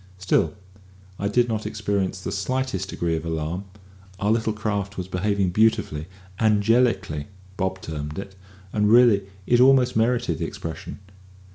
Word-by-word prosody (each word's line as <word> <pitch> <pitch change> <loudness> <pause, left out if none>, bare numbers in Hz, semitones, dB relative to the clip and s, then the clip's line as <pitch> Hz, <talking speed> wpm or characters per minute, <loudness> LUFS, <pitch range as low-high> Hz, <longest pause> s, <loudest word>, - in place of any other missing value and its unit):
Still, 90 -3 +1 0.6
I 100 - 0
did 120 +4 +2
not 110 -2 -2
experience 100 -3 -1
the - - -4
slightest 100 -2 -2
degree 85 -1 -1
of 80 - -3
alarm: 80 +3 -3 0.5
our 105 +2 +1
little 110 0 +1
craft 100 -2 -3
was 90 -1 -4
behaving 95 0 0
beautifully 90 -7 +1 0.3
angelically. 105 - +2 0.3
Bob 95 -1 -2
termed 75 -1 -5
it, 100 0 -6 0.4
and 105 -1 +2
really 115 -5 +6 0.2
it 120 +3 +3
almost 130 -1 +5
merited 115 -7 +1
the 85 - -1
expression. 80 -1 -7
100 Hz, 140 wpm, -24 LUFS, 90-110 Hz, 0.6 s, really